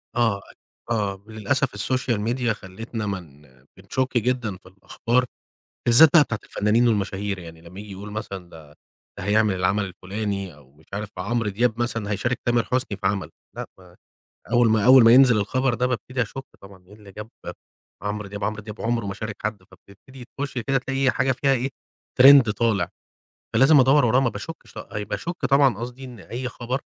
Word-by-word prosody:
آه، 115 -4 +2 0.5
أ - - -4
آه 100 -3 -2
للأسف 110 +4 -1
الSocial 120 +1 0
Media 125 -1 -1
خلِّتنا 110 +2 -6
مَن 85 -8 -6 0.4
بنشُكّ 125 +7 -2
جدًا 120 -4 -1
في 95 - -31
الأخبار، 115 +6 -1 0.6
بالذات 140 +7 +9
بقى 160 -4 +8
بتاعة 110 -5 -4
الفنانين 110 +4 +1
والمشاهير 100 -2 -1
يعني 80 -2 -11
لمّا 90 +3 -12
ييجي 105 -1 -10
يقولوا 100 +2 -8
مثلًا 100 -4 -6
ده 75 -3 -14 0.4
ده - - -6
هيعمل 105 0 +2
العمل 95 +3 0
الفلاني 95 -1 -5
أو 70 -3 -21
مش 75 +3 -24
عارف 105 0 -4
عمرو 115 +3 -1
دياب 115 +3 0
مثلًا 115 -4 -2
هيشارك 120 +5 -1
تامر 120 -1 +2
حسني 125 -5 -2
في 95 - -1
عمل، 100 -1 -2 0.3
لأ - - -5
ب - - -18 0.6
أول 120 -1 +4
ما 110 -1 +2
أول 130 -1 +8
ما 115 - +7
ينزل 125 -3 +6
الخبر 130 +4 0
ده 125 +2 0
بابتدي 125 +1 -3
أشُكّ 135 +4 -5 0.2
طبعًا 95 -2 -15
إيه 100 - -16
اللي 105 -2 -15
جاب 105 +3 -9 0.7
عمرو 105 0 -4
دياب 100 +1 -7
عمرو 105 -1 -2
دياب 105 +1 -9
عُمره 115 -2 -1
ما 100 - -4
شارك 110 +1 -6
حد 105 -3 -3
فبتبتدي 100 +7 -16
تخُشّي 135 -4 -4
كده 135 +2 +1
تلاقي 135 +1 0
حاجة 130 - +1
فيها 135 +2 +1
إيه، 130 +1 -1 0.5
Trend 135 -4 +8
طالع، 105 -5 0 0.7
فلازم 135 +4 +6
أدوّر 135 +2 +4
وراه 125 +3 +3
ما 130 - +2
باشكّش 165 +6 -9
آه 105 - -6
باشُكّ 165 - -4
طبعًا 135 -5 +3
قصدي 125 +3 -7
إن 125 -4 -10
أي 125 +5 -5
خبر، 125 +3 -4
110 Hz, 185 wpm, -23 LUFS, 100-125 Hz, 0.7 s, بالذات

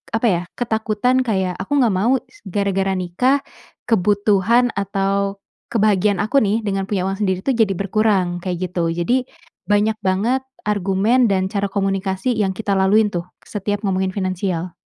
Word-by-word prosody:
apa 225 +1 +2
ya, 175 -5 +2 0.2
ketakutan 230 +2 +1
kayak, 190 -6 -1
"Aku 285 +8 -1
enggak 235 -6 +3
mau 225 +8 +3
s 260 - -23
gara-gara 195 0 0
nikah, 185 +10 +1 0.5
kebutuhan 210 +3 +3
atau 200 0 -1 0.3
kebahagiaan 205 -3 +2
aku 220 +7 +2
nih 210 +2 +1
dengan 195 -2 -1
punya 195 -3 -1
uang 195 +1 -3
sendiri 190 -3 0
tuh 270 - +1
jadi 220 -4 +2
berkurang." 195 -2 +1
Kayak 180 -1 -3
gitu. 170 -2 0
Jadi 240 +10 0 0.4
banyak 210 +1 +2
banget 215 +8 +1 0.2
argumen 205 +5 +2
dan 190 -1 +1
cara 200 -1 0
komunikasi 195 +2 -1
yang 195 -3 +1
kita 215 -2 -3
laluin 205 +3 +4
tuh, 170 -1 -3 0.2
setiap 205 0 -3
ngomongin 190 -1 0
finansial. 185 -2 -2
200 Hz, 155 wpm, -20 LUFS, 190-220 Hz, 0.5 s, laluin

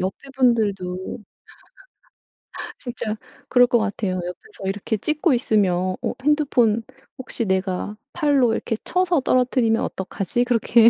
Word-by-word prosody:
옆에 190 +9 -4
분들도 205 -5 0 1.5
진짜 230 -3 -4 0.3
그럴 245 -1 +6
거 240 0 +3
같아요. 210 -3 -1
옆에서 185 - -7
이렇게 205 +3 -1
찍고 305 - +1
있으면 185 -7 +1
'어 - - 0
핸드폰 260 -7 +3 0.4
혹시 255 -2 -3
내가 190 +1 -1 0.2
팔로 285 -8 +3
이렇게 225 - -1
쳐서 360 -3 +2
떨어뜨리면 250 -3 +2
어떡하지?' 195 +5 -2
그렇게 235 -1 +5
230 Hz, 280 characters per minute, -23 LUFS, 195-255 Hz, 1.5 s, 그럴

